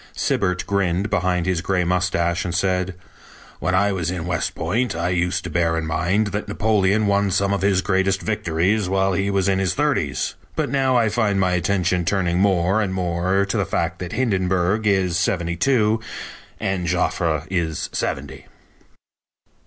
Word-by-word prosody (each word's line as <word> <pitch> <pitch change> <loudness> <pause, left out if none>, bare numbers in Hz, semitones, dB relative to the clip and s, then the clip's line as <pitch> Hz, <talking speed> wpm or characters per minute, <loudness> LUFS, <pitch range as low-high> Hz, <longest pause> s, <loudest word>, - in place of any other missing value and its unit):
Sibert 90 0 0
grinned 100 0 0
behind 90 -3 +1
his 90 -3 0
gray 95 -1 0
mustache, 85 -1 0
and 85 -1 -3
said: 90 0 0 0.6
"When 95 - 0
I 100 +2 +3
was 90 -4 -2
in 90 -2 -3
West 90 -2 -2
Point 120 -3 -1
I 85 +2 -1
used 90 +1 0
to 90 - -6
bear 80 0 +1
in 80 - -2
mind 95 +7 0
that 105 +2 -3
Napoleon 105 -1 +2
won 100 0 +2
some 100 +2 +1
of 100 - -1
his 95 -1 +2
greatest 95 -1 +1
victories 95 0 0
while 95 0 +1
he 100 +2 0
was 100 -1 +1
in 95 -1 +2
his 95 -3 0
thirties, - - 0 0.2
but - - -1
now 135 -2 +2
I 115 -2 +3
find 105 -3 +1
my 90 -1 +2
attention 90 -1 +1
turning 90 -1 0
more 95 +1 +2
and 95 -3 -2
more 90 +2 0
to 100 +3 -2
the 100 - +2
fact 85 -3 -2
that 90 -1 -6
Hindenburg 95 -3 +1
is 95 -4 +2
seventy 85 -2 0
two 110 +2 +2 0.6
and 95 -4 -2
Joffre 80 -2 0
is 80 -4 -1
seventy." - - -4
95 Hz, 170 wpm, -22 LUFS, 90-100 Hz, 0.6 s, I